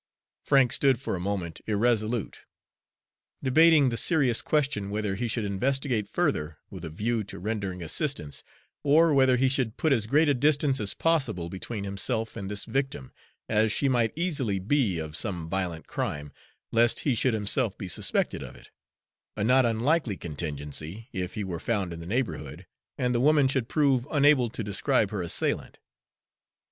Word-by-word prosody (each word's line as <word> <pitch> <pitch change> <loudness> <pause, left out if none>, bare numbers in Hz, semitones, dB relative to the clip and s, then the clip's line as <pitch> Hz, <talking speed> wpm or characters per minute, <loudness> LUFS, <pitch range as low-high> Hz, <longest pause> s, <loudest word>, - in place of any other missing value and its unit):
Frank 135 -4 +4
stood 135 -4 +3
for 135 - -3
a - - -4
moment 90 -3 -4
irresolute, 110 +1 0 1.0
debating 150 +1 +5
the 115 - -3
serious 135 -8 +3
question 140 -10 0
whether 105 -1 -2
he 120 +5 -2
should 115 -1 -1
investigate 125 +2 -1
further 75 +1 -1
with 95 -3 -9
a 80 - -5
view 110 +7 -1
to - - -9
rendering 100 -2 -4
assistance, 85 - -3 0.4
or 155 +2 +4
whether 130 -2 +4
he 130 +2 +3
should 130 -4 0
put 155 -3 +2
as 110 -5 0
great 150 +6 +3
a 145 - +4
distance 140 0 +2
as 100 -2 -2
possible 130 - 0
between 100 +3 -6
himself 110 +4 -2
and 100 -4 -5
this 105 0 -1
victim, 135 - -3 0.3
as 110 0 +2
she 140 - +1
might 120 -4 +2
easily 145 - -1
be, 105 - +1
of 80 -1 -5
some 90 -6 -3
violent 90 -2 -3
crime, 75 0 -4 0.4
lest 115 0 +3
he 140 - +1
should 120 +1 +1
himself 105 +1 0
be 95 - -6
suspected 90 - -1
of - - -9
it - - -17 0.6
a - - -2
not 125 +2 +4
unlikely 115 - 0
contingency, 75 - -6
if 90 -3 -4
he 105 - -2
were 90 -4 -4
found 100 -3 -1
in 85 - -8
the 85 - -8
neighborhood 120 +5 -3 0.3
and 125 -1 0
the 120 - +1
woman 145 0 +4
should 130 -3 -1
prove 140 -4 +2
unable 145 -4 +4
to 115 - -5
describe 105 +2 +1
her 105 -3 -3
assailant. 85 - -2
115 Hz, 170 wpm, -27 LUFS, 95-135 Hz, 1.0 s, debating